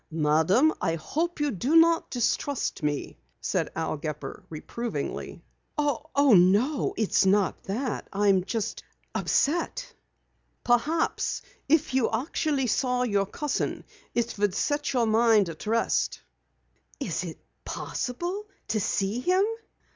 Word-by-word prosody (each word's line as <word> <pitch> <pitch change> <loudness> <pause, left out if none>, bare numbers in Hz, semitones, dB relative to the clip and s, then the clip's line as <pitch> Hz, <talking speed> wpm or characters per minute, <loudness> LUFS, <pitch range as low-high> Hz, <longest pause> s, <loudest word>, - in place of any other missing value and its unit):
"Madam, 160 - +3
I 165 - +1
hope 320 - -2
you 295 -1 +1
do 255 - 0
not 330 0 +5
distrust 255 +3 -1
me," 150 -1 -2 0.2
said - - -1
Al - - -2
Gepper 150 0 -6
reprovingly. 230 +9 -5 0.3
"Oh, 290 -2 +2
no, 205 - +3
it's 220 -2 +2
not 195 +1 +2
that. 235 +5 -3
I'm 195 -2 +3
just 220 +2 -3 0.3
upset." 345 - 0 0.7
"Perhaps, 285 +7 +1 0.3
if 310 -2 +3
you 260 -3 +2
actually 275 +3 0
saw 250 +1 +1
your 200 -5 +1
cousin 295 +7 -2 0.3
it 235 -3 -1
would 205 -2 +1
set 290 +6 0
your 245 -3 +2
mind 220 -3 +4
at 165 +5 -8
rest." 230 +1 +1 0.8
"Is - - -2
it - - -6 0.3
possible 350 - -4 0.2
to 215 0 +1
see 200 +3 0
him?" 365 +8 +3
240 Hz, 120 wpm, -27 LUFS, 195-295 Hz, 0.8 s, not